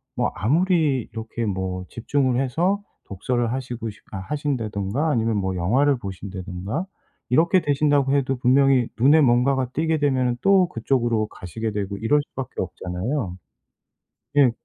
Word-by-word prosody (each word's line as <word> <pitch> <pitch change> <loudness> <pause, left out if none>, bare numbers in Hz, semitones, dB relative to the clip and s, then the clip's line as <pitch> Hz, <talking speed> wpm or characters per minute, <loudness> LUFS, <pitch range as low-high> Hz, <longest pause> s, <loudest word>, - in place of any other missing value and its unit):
뭐 - - 0
아무리 150 - +2
이렇게 115 +1 -4
뭐 95 -2 -3
집중을 130 +1 0
해서 175 +10 0 0.2
독서를 120 +4 -1
하시고 125 -3 -4
싶 105 -1 -13
아 95 - -5
하신다든가 120 0 -2
아니면 115 -6 +1
뭐 95 -1 -1
영화를 130 +11 +2
보신다든가 95 - -5 0.4
이렇게 170 +7 +4
되신다고 145 -2 +2
해도 135 -2 +1
분명히 130 0 +4
눈에 145 +6 +6
뭔가가 130 0 +3
띄게 160 +1 +1
되면은 130 -4 +1
또 195 -2 +5
그쪽으로 115 -2 0
가시게 110 +4 -5
되고 100 -1 -3
이럴 115 +8 +2
수밖에 130 -1 -5
없잖아요. 90 - -3 1.0
예. 140 -4 +6
125 Hz, 330 characters per minute, -23 LUFS, 105-145 Hz, 1.0 s, 눈에